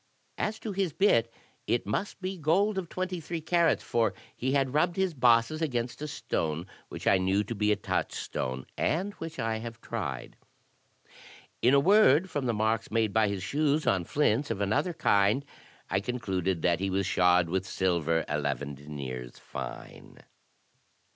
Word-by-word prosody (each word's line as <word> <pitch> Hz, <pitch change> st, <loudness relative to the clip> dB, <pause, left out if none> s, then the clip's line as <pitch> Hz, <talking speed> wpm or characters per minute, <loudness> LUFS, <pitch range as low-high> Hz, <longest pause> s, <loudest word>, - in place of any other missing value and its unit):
As 215 Hz, +1 st, -1 dB
to 220 Hz, -, -4 dB
his 190 Hz, -5 st, -1 dB
bit, 115 Hz, -, +3 dB, 0.4 s
it 120 Hz, -, +1 dB
must 190 Hz, -, -3 dB
be 190 Hz, +1 st, -2 dB
gold 190 Hz, +6 st, +2 dB
of 175 Hz, -3 st, -6 dB
twenty 185 Hz, -1 st, -3 dB
three 165 Hz, +1 st, -4 dB
carats, 165 Hz, +1 st, +2 dB
for 115 Hz, -1 st, +1 dB, 0.2 s
he 130 Hz, +2 st, -1 dB
had 135 Hz, -2 st, +1 dB
rubbed 170 Hz, +3 st, +2 dB
his 190 Hz, -2 st, 0 dB
bosses 125 Hz, +3 st, +3 dB
against 125 Hz, -4 st, -2 dB
a 150 Hz, -, -3 dB
stone 80 Hz, -, -2 dB, 0.2 s
which -, -, -8 dB
I 95 Hz, -, +5 dB
knew 95 Hz, +2 st, +2 dB
to 110 Hz, -, -5 dB
be 105 Hz, -1 st, +1 dB
a -, -, +4 dB
touchstone, 65 Hz, -9 st, -3 dB
and 190 Hz, +6 st, 0 dB
which 165 Hz, 0 st, -6 dB
I 115 Hz, -3 st, -1 dB
have 115 Hz, 0 st, -7 dB
tried. 65 Hz, -, -5 dB, 1.2 s
In 125 Hz, +3 st, +5 dB
a -, -, +7 dB
word, 190 Hz, -1 st, +5 dB
from 140 Hz, -3 st, -2 dB
the -, -, +2 dB
marks 110 Hz, +1 st, 0 dB
made 110 Hz, -2 st, +1 dB
by 110 Hz, -1 st, +4 dB
his 100 Hz, -2 st, -3 dB
shoes 150 Hz, +5 st, +1 dB
on 95 Hz, -3 st, +2 dB
flints 140 Hz, -, +1 dB
of -, -, -2 dB
another 110 Hz, -, 0 dB
kind, 105 Hz, -3 st, +2 dB, 0.4 s
I 95 Hz, -, +1 dB
concluded 95 Hz, -6 st, -2 dB
that 85 Hz, -2 st, +2 dB
he 95 Hz, 0 st, -1 dB
was 95 Hz, 0 st, 0 dB
shod 90 Hz, -1 st, +3 dB
with 95 Hz, +2 st, -2 dB
silver 85 Hz, -4 st, 0 dB
eleven 75 Hz, -1 st, -2 dB
deniers 70 Hz, -4 st, -7 dB
fine." -, -, -8 dB
115 Hz, 165 wpm, -29 LUFS, 95-155 Hz, 1.2 s, a